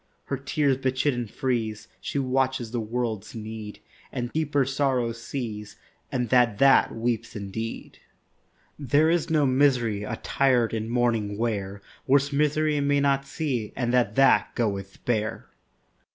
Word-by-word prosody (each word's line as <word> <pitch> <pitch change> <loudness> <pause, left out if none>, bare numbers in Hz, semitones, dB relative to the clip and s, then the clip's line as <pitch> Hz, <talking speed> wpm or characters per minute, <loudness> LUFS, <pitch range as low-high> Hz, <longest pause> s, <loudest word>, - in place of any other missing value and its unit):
Her 140 - -2
tears 140 0 +1
bechidden 130 -2 0
freeze; 110 -4 -2
She - - -4
watches 130 -3 0
the 120 - -2
world's 115 -2 -3
need, 110 -2 -7 0.3
And 120 -2 -4
deeper 145 -3 +1
sorrow 135 -3 0
sees, 115 -3 -6 0.4
And 125 -3 -1
that 120 -4 +4
that 135 +4 +5
weeps 115 -1 -2
indeed. 110 +3 -6 0.8
There 145 +4 +3
is 170 -2 0
no 155 -3 +3
misery 130 -6 +2
Attired 125 +2 +1
in 110 0 -2
mourning 115 -4 0
wear, 100 -3 -2 0.2
Worse 140 +1 +3
misery 150 +1 +2
may 145 0 +2
not 140 -1 +1
see, 135 -8 -3
And 120 -2 -1
that 120 -4 +2
that 135 - +4
goeth 100 -4 -3
bare. 110 -3 -1
125 Hz, 135 wpm, -26 LUFS, 110-140 Hz, 0.8 s, that